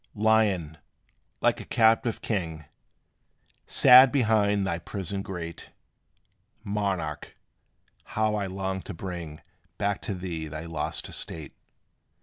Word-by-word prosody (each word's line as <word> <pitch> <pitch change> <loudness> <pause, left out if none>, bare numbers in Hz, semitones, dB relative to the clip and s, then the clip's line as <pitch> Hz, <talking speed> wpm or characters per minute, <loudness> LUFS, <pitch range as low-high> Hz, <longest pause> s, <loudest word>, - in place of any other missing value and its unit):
Lion, 100 -8 +2 0.6
like - - +2
a - - -7
captive 115 0 +2
king, 80 -8 -3 1.0
Sad 125 +1 +8
behind 105 -6 +2
thy 85 -3 -2
prison 95 +2 -5
grate, 85 -4 -7 0.9
Monarch, 100 -7 -3 0.8
how 110 0 +2
I 105 -2 -1
long 95 0 -3
to 95 - -8
bring 85 -3 -7 0.4
Back 100 -1 -1
to 100 - -4
thee 85 -4 -5
thy 80 +1 -7
lost 80 -2 -4
estate! 80 -3 -8
95 Hz, 110 wpm, -27 LUFS, 85-105 Hz, 1.0 s, Sad